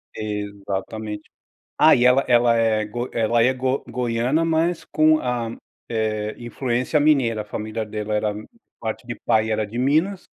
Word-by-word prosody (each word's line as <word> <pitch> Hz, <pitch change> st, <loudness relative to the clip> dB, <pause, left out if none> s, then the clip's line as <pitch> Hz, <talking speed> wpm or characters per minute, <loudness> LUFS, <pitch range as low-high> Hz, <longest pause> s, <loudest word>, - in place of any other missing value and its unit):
Exatamente. 105 Hz, 0 st, -5 dB, 0.5 s
Ah 155 Hz, +1 st, +7 dB
e 120 Hz, -, +2 dB
ela 125 Hz, +2 st, +5 dB
ela 120 Hz, -1 st, +4 dB
é 110 Hz, -2 st, +2 dB
go 120 Hz, +4 st, -4 dB
ela 115 Hz, +1 st, +2 dB
é 130 Hz, +3 st, +4 dB
go 130 Hz, +1 st, -1 dB
goiana, 125 Hz, +5 st, 0 dB
mas 165 Hz, +1 st, 0 dB
com 155 Hz, 0 st, +3 dB
a 125 Hz, -4 st, -2 dB, 0.4 s
eh, 110 Hz, -2 st, -2 dB
influência 125 Hz, +4 st, -1 dB
mineira, 130 Hz, -8 st, +2 dB
a -, -, -15 dB
família 110 Hz, +1 st, -4 dB
dela 105 Hz, 0 st, -4 dB
era 105 Hz, 0 st, 0 dB, 0.5 s
parte 110 Hz, +2 st, -4 dB
de 120 Hz, -, -5 dB
pai 110 Hz, -1 st, +2 dB
era 110 Hz, -1 st, 0 dB
de 110 Hz, +4 st, -7 dB
Minas, 160 Hz, +9 st, +1 dB
115 Hz, 155 wpm, -22 LUFS, 110-130 Hz, 0.5 s, Ah